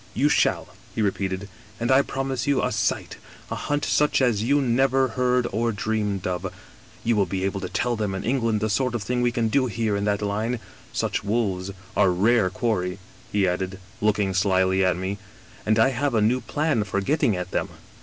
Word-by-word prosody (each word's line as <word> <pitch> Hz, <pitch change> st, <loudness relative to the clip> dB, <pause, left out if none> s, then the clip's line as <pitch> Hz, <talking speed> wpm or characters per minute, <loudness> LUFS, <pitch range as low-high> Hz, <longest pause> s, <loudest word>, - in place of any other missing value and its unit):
You -, -, +3 dB
shall,' -, -, +2 dB, 0.3 s
he -, -, 0 dB
repeated, 95 Hz, -1 st, -1 dB, 0.2 s
* 105 Hz, +1 st, -24 dB
and 120 Hz, +2 st, 0 dB
I 130 Hz, +1 st, +6 dB
promise 135 Hz, -2 st, -3 dB
you 140 Hz, -2 st, +2 dB
a -, -, 0 dB
sight, -, -, -1 dB, 0.3 s
a -, -, -1 dB
hunt 145 Hz, 0 st, -1 dB
such 150 Hz, 0 st, +2 dB
as 120 Hz, -6 st, +2 dB
you 140 Hz, +6 st, +3 dB
never 130 Hz, +1 st, +2 dB
heard 125 Hz, +1 st, +1 dB
or 115 Hz, +3 st, 0 dB
dreamed 105 Hz, -2 st, -2 dB
of 90 Hz, +1 st, -2 dB, 0.3 s
— 115 Hz, 0 st, -24 dB
^you 115 Hz, -, +3 dB
will 100 Hz, -3 st, +2 dB
be 95 Hz, -1 st, -2 dB
able 100 Hz, +1 st, -1 dB
to 90 Hz, -, -4 dB
tell 120 Hz, -1 st, 0 dB
them 105 Hz, -3 st, -2 dB
in 95 Hz, -, -4 dB
England 115 Hz, -4 st, +1 dB
the 110 Hz, -, 0 dB
sort 125 Hz, +3 st, 0 dB
of 115 Hz, -, -2 dB
thing 125 Hz, +2 st, -1 dB
we 120 Hz, 0 st, +2 dB
can 115 Hz, -1 st, 0 dB
do 130 Hz, +3 st, +2 dB
here 110 Hz, -2 st, -1 dB
in 100 Hz, 0 st, -1 dB
that 105 Hz, 0 st, 0 dB
line 110 Hz, +4 st, -1 dB, 0.2 s
— -, -, -24 dB
such -, -, -1 dB
wolves 100 Hz, -3 st, -1 dB, 0.3 s
are 100 Hz, -2 st, +4 dB
rare 100 Hz, +3 st, +3 dB
quarry,' 95 Hz, -4 st, -1 dB, 0.3 s
he 100 Hz, -2 st, +2 dB
added, 95 Hz, +2 st, -2 dB, 0.2 s
look 105 Hz, 0 st, +2 dB
ing 100 Hz, -2 st, 0 dB
slyly 95 Hz, 0 st, +2 dB
at 90 Hz, -2 st, +2 dB
me, 95 Hz, +2 st, -3 dB, 0.5 s
'and 110 Hz, 0 st, +3 dB
I 110 Hz, +4 st, +5 dB
have 135 Hz, 0 st, -1 dB
a -, -, +4 dB
new 120 Hz, +5 st, +2 dB
plan 150 Hz, -7 st, 0 dB
for 100 Hz, -1 st, -2 dB
getting 110 Hz, -, +1 dB
at 90 Hz, 0 st, -5 dB
them.' -, -, -1 dB
110 Hz, 215 wpm, -24 LUFS, 95-125 Hz, 0.5 s, I